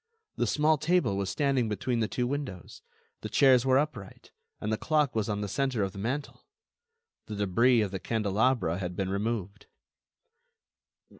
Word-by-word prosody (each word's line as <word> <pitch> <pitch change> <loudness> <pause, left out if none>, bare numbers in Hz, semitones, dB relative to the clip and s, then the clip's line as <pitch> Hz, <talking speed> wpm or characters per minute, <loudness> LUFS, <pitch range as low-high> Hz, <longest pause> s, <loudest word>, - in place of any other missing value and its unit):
The - - 0
small 155 0 +2
table 155 - +1
was 100 -1 -2
standing 135 -5 +1
between 115 +3 -1
the 110 - +1
two 125 - -2
windows, 130 -9 -5 0.4
the - - -5
chairs 130 -2 +4
were 130 0 +5
upright, 130 -10 -4 0.3
and 105 +1 -2
the - - 0
clock 150 -4 +1
was 110 -1 0
on 105 0 -2
the 105 - -2
centre 130 0 -1
of 95 - -2
the 100 - -9
mantel. 130 +8 -4 0.8
The 105 - -5
debris 115 +5 +3
of 100 -3 -1
the 95 - -4
candelabra 110 -3 0
had 90 -1 -4
been 95 0 -2
removed. 105 -1 -3
110 Hz, 165 wpm, -28 LUFS, 100-135 Hz, 0.8 s, were